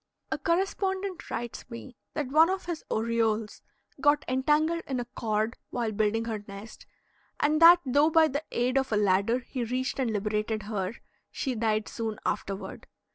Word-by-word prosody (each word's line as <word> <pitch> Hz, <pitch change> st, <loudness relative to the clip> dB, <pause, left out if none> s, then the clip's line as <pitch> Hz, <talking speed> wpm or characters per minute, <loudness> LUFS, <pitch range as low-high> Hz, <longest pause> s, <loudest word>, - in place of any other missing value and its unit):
A -, -, -1 dB
correspondent 380 Hz, +3 st, -1 dB
writes 240 Hz, +1 st, -5 dB
me 240 Hz, +1 st, -9 dB, 0.2 s
that 290 Hz, -4 st, -2 dB
one 320 Hz, +3 st, +6 dB
of 380 Hz, 0 st, -2 dB
his 340 Hz, -2 st, -4 dB
orioles 225 Hz, -1 st, 0 dB, 0.4 s
got 290 Hz, +1 st, +3 dB
entangled 300 Hz, +6 st, +2 dB
in 265 Hz, -2 st, -2 dB
a 245 Hz, -, -3 dB
cord 220 Hz, -1 st, -2 dB
while 235 Hz, -3 st, -2 dB
building 215 Hz, +2 st, 0 dB
her 220 Hz, -3 st, -4 dB
nest, 200 Hz, +2 st, -10 dB, 0.5 s
and 305 Hz, +2 st, +2 dB
that 345 Hz, +1 st, +9 dB
though 285 Hz, +4 st, +4 dB
by 320 Hz, 0 st, +5 dB
the 285 Hz, +1 st, -3 dB
aid 250 Hz, +3 st, +1 dB
of 265 Hz, -2 st, -3 dB
a 215 Hz, -, +2 dB
ladder 205 Hz, +4 st, +2 dB
he 255 Hz, -, -3 dB
reached 255 Hz, +3 st, -2 dB
and 255 Hz, -3 st, +1 dB
liberated 215 Hz, +1 st, -1 dB
her, 205 Hz, 0 st, -3 dB, 0.3 s
she 265 Hz, -, -3 dB
died 220 Hz, -2 st, 0 dB
soon 220 Hz, -2 st, -4 dB
afterward. 195 Hz, 0 st, -4 dB
240 Hz, 165 wpm, -28 LUFS, 220-295 Hz, 0.5 s, that